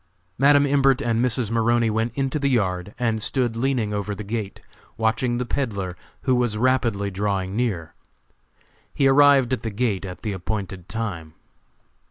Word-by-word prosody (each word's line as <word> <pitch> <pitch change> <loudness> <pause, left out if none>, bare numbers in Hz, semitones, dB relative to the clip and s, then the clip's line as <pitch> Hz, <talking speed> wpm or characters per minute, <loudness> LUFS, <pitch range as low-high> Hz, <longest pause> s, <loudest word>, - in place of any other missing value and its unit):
Madam 145 +1 +5
Imbert 135 -2 +3
and 115 0 0
Mrs. 120 -3 -1
Maroney 115 0 +2
went 110 +2 0
into 135 +1 -1
the 140 -1 +1
yard 95 -5 -1
and 115 -3 0
stood 120 0 0
leaning 120 -3 0
over 105 0 -3
the 105 - -6
gate, 105 -1 -4 0.4
watching 115 +2 0
the 125 - -2
peddler, 100 -9 -3 0.3
who 130 - +2
was 120 -3 0
rapidly 115 -5 +1
drawing 95 -1 -2
near. 100 -10 -2 1.0
He 135 - +3
arrived 135 -2 +5
at 130 - -1
the 115 - -3
gate 105 -2 -1
at 90 0 -8
the 110 - -2
appointed 95 -1 -5
time. 90 -7 -4
115 Hz, 160 wpm, -23 LUFS, 100-125 Hz, 1.0 s, Madam